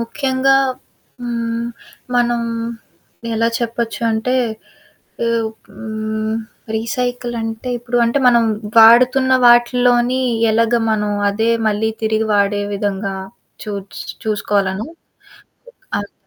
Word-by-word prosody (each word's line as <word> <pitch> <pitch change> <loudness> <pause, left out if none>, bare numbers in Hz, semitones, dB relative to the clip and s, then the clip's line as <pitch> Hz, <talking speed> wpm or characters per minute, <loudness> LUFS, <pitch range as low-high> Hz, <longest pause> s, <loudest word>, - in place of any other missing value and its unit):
ముఖ్యంగా 265 +2 +1 0.7
హ్మ్, 235 -1 -2 0.5
మనం 240 -1 +2 0.9
ఎలా 230 +1 +2
చెప్పచ్చు 235 0 -3
అంటే, 220 +4 0 0.9
ఎవ్ 230 -1 +1 0.2
హ్మ్, 215 +1 -4 0.4
రీసైకిలంటే 240 0 -3
ఇప్పుడు 240 +1 -3
అంటే, 235 +4 +1
మనం 235 -1 +4 0.3
వాడుతున్న 250 +3 +6
వాటిలోని 245 +1 +4 0.3
ఎలాగ 230 +1 +2
మనం 210 -1 0 0.2
అదే 225 +3 0 0.2
మళ్ళీ 215 +1 0
తిరిగి 220 0 +1
వాడే 205 0 +2
విధంగా 195 -1 -2 0.5
చూట్స్ 200 -2 -6 0.2
చూసుకోవాలను. 205 -1 -1 1.1
అవును. 205 0 -6
230 Hz, 90 wpm, -18 LUFS, 215-240 Hz, 1.1 s, వాడుతున్న